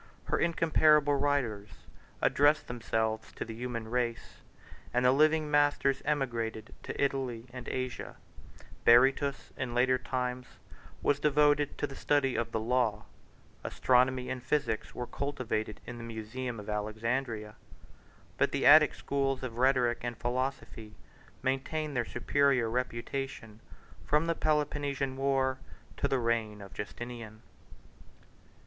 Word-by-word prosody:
Her - - -1
incomparable 155 -3 +4
writers 130 -8 0 0.5
address 145 +2 +4
themselves 110 -2 -2
to - - -5
the 115 - -7
human 115 -1 -5
race; 115 -1 -3 0.5
the 125 +1 +4
living 155 +2 +3
masters 145 -2 +2
emigrated 115 -7 -2
to - - -7
Italy 130 -4 -1
and 125 -2 -8
Asia; 130 -1 -4 0.7
Berytus, 135 +4 +4
in 125 -4 -3
later 130 +1 +3
times, 125 0 -3 0.6
was 145 - +2
devoted 145 0 +3
to - - -1
the 135 - -8
study 140 -3 +1
of 115 0 -2
the 110 - -1
law; 115 -2 0 0.6
astronomy 125 +7 +2
and 130 -1 -4
physic 130 -4 0
were 125 - -3
cultivated 120 -7 -3
in 120 -1 -7
the - - -7
musaeum 115 +2 -5
of 105 - -9
Alexandria; 110 +1 -2 0.9
but - - +3
the - - -1
Attic - - +8
schools 135 -1 -1
of 120 -2 -5
rhetoric 125 -2 +3
and 120 -1 -4
philosophy 120 -3 -3 0.5
maintained 145 +3 -1
their 120 -1 0
superior 130 -1 +1
reputation 120 -2 -4 0.4
from 150 +2 +2
the 165 - +1
Peloponnesian 145 -4 -1
war 135 -1 +1 0.4
to - - +1
the 135 -1 +1
reign 115 -3 -1
of 100 -1 -11
Justinian. 115 0 -7
125 Hz, 125 wpm, -30 LUFS, 115-140 Hz, 0.9 s, Attic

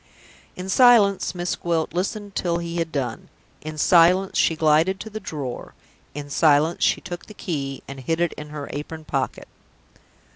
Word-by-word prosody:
In 180 +1 -6
silence, 205 -4 +5
Miss 175 0 -2
Gwilt 165 -2 -1
listened 200 +3 -3
till 170 -2 0
he 170 0 -4
had 165 -1 -2
done. 125 -6 -4 0.3
In 155 0 -7
silence, 180 +4 +4
she 165 - +3
glided 160 +4 +3
to 220 - -8
the 215 - -5
drawer. 145 - -6 0.4
In 145 -1 -6
silence, 150 +2 +3
she - - +2
took 175 -1 -8
the 215 - -12
key 140 -8 -4
and 140 0 -8
hid 160 +6 -2
it 175 -1 +1
in 150 0 -9
her 150 -1 -6
apron 155 +2 -6
pocket. 135 -3 -3
165 Hz, 170 wpm, -23 LUFS, 150-185 Hz, 0.4 s, silence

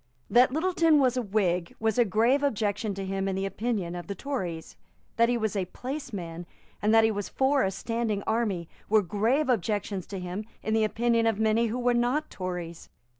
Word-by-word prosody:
That 250 +2 +6
Littleton 325 0 +3
was 260 -3 +3
a 250 - +1
Whig 185 -5 0
was 220 +1 0
a 240 - +6
grave 230 +7 +3
objection 210 -6 -1
to 195 0 -4
him 195 0 -2
in 190 - -1
the 195 +1 -1
opinion 195 -3 -2
of 175 - -7
the 200 - -4
Tories. 185 - -4 0.4
That 235 0 +4
he 245 - +2
was 220 -2 -1
a 190 -2 0
placeman, 200 - -6 0.3
and 210 - +2
that 225 0 +6
he 220 - +3
was 205 -1 -4
for 270 +1 +2
a 190 - +2
standing 215 +1 -2
army, 215 -7 -1 0.2
were 215 0 +4
grave 225 - +1
objections 205 -4 -1
to 195 - -5
him 180 +3 -4 0.2
in 220 - -1
the 220 0 +3
opinion 230 +1 +1
of 225 -3 +1
many 220 +1 +2
who 225 +3 -3
were 245 0 +2
not 245 +6 0
Tories. 175 -3 -6
220 Hz, 200 wpm, -27 LUFS, 195-240 Hz, 0.4 s, That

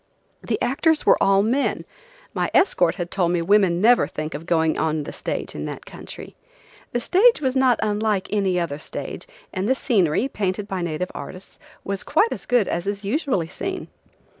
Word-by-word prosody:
The - - -2
actors 300 +5 +2
were - - +5
all 195 0 +4
men; 255 +6 0 0.5
my - - -1
escort 180 - +3
had 175 -1 -5
told 175 -3 +1
me 175 - +1
women 190 -2 +3
never 235 +5 +5
think 155 +1 -5
of 155 +4 -7
going 160 -2 +2
on 155 -1 0
the - - -7
stage - - -4
in - - -5
that - - -7
country. - - -10 0.6
The 240 - 0
stage 420 - +4
was 260 -3 -1
not 260 -2 +3
unlike 210 -2 0
any 190 -3 +1
other 155 -4 -3
stage, - - -7 0.3
and 190 +3 -1
the 260 - +4
scenery, 205 - +1
painted 200 -4 -2
by 190 -3 -3
native 170 +1 -3
artists, 185 +1 -9 0.2
was 195 0 -3
quite 420 +9 +2
as - - -6
good 245 -5 +3
as 175 +2 -2
is 200 0 -3
usually 255 - 0
seen. 375 - -5
200 Hz, 185 wpm, -23 LUFS, 175-245 Hz, 0.6 s, were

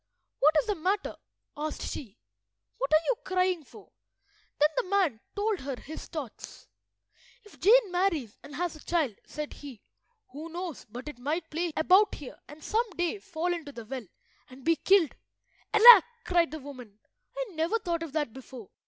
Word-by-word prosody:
"What 305 +3 +5
is - - -1
the 425 - 0
matter?" 385 +3 -1 0.4
asked 305 +1 -4
she. 230 -6 -6 0.6
"What 270 - -1
are 310 +1 +4
you - - +2
crying 365 -3 0
for?" - - -16 0.7
Then 300 +1 +5
the 485 -7 -1
man 375 - +2 0.2
told 415 -1 0
her 270 0 -4
his 315 +2 -9
thoughts— 300 -9 -8 0.8
"If 420 - -18
Jane 435 0 +5
marries 345 - 0
and 285 - -11
has 350 +1 -2
a 310 - -14
child," 320 -9 0
said 300 -1 -6
he, 270 -7 -11 0.5
"who 305 +5 -8
knows 345 -3 -6
but 245 +6 -8
it 295 -5 -8
might 315 +6 -3
play 335 +2 -1
about 375 +6 +5
here 285 - -10
and 295 +1 -13
some 455 +2 0
day 350 +4 -1
fall 355 -3 -2
into 325 -4 -6
the 235 -4 -9
well 250 -2 -6 0.4
and 255 +1 -14
be 330 +1 +3
killed?" 370 -3 +3 0.6
"Alack!" 450 -2 +10 0.2
cried 345 -2 +3
the 315 - -6
woman, 255 -7 -11 0.4
"I - - -1
never 330 +6 0
thought 345 -6 -2
of 325 -4 -6
that 295 -7 -1
before. 255 -5 -11
320 Hz, 175 wpm, -29 LUFS, 285-370 Hz, 0.8 s, Alack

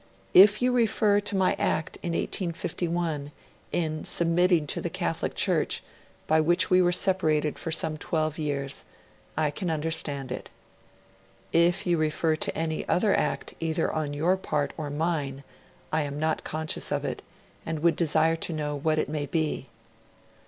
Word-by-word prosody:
'If 205 +4 +7
you 250 - +3
refer 215 -4 +3
to 205 0 -2
my 190 -1 +3
act 155 - -1
in 170 - -3
1851 170 -4 -2 0.4
in 155 -3 -1
submitting 170 -1 +2
to - - -2
the - - -2
Catholic - - -2
Church, - - +1 0.4
by 155 0 +3
which 175 +4 +2
we 185 0 +6
were 175 -1 +3
separated 160 -5 +1
for 165 - -3
some 160 -1 -1
twelve 155 -1 -1
years, 140 -2 -3 0.5
I 155 -2 +2
can 175 +4 -3
understand 150 -4 -3
it. - - -5 1.0
'If 170 +2 +3
you 175 -2 +2
refer 155 +1 +1
to - - -2
any 160 -1 -1
other 200 +3 +3
act - - -1
either 165 0 0
on 150 -2 -2
your 175 +6 +2
part 150 -6 -1
or 155 -2 -4
mine 145 -3 -2 0.5
I 160 - +3
am 145 -1 -4
not 155 0 0
conscious 155 0 -2
of - - -1
it, - - -3 0.4
and 160 -2 -4
would 170 -1 +4
desire 160 0 +2
to 165 - -3
know 150 -1 -2
what 155 +2 0
it 155 - +1
may 145 -1 -3
be. 160 -1 -1
160 Hz, 160 wpm, -27 LUFS, 150-175 Hz, 1.0 s, If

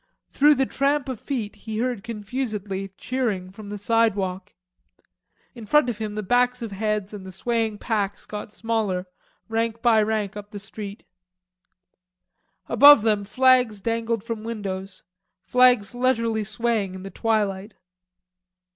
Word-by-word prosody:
Through 295 +1 +5
the 270 0 +2
tramp 280 +1 0
of 255 -5 -4
feet 230 -8 -4
he 215 +1 -6
heard 240 -3 -1
confusedly 210 -3 -4
cheering 215 -8 -2
from 205 +1 -10
the 205 - -5
sidewalk. 205 -3 0 1.0
In 230 -4 -10
front 280 -1 +4
of 220 - -9
him 215 -1 -3
the 215 0 -4
backs 245 +3 +2
of 225 - -5
heads 210 0 -2
and 205 -2 -7
the 190 - -9
swaying 225 +2 -1
packs 205 -3 -2
got 210 0 -7
smaller, 215 -5 -1 0.4
rank 230 0 -2
by 225 -3 +5
rank 210 -2 -1
up 205 0 -8
the 210 - -8
street. 200 +1 -8 1.6
Above 285 -6 +8
them 210 -2 +2
flags 250 0 +3
dangled 230 0 -1
from 230 -2 -5
windows, 195 -4 -5 0.4
flags 250 -5 +4
leisurely 230 -3 +1
swaying 215 -2 -1
in 190 - -8
the 195 - -7
twilight. 210 -3 -1
220 Hz, 140 wpm, -24 LUFS, 205-235 Hz, 1.6 s, Above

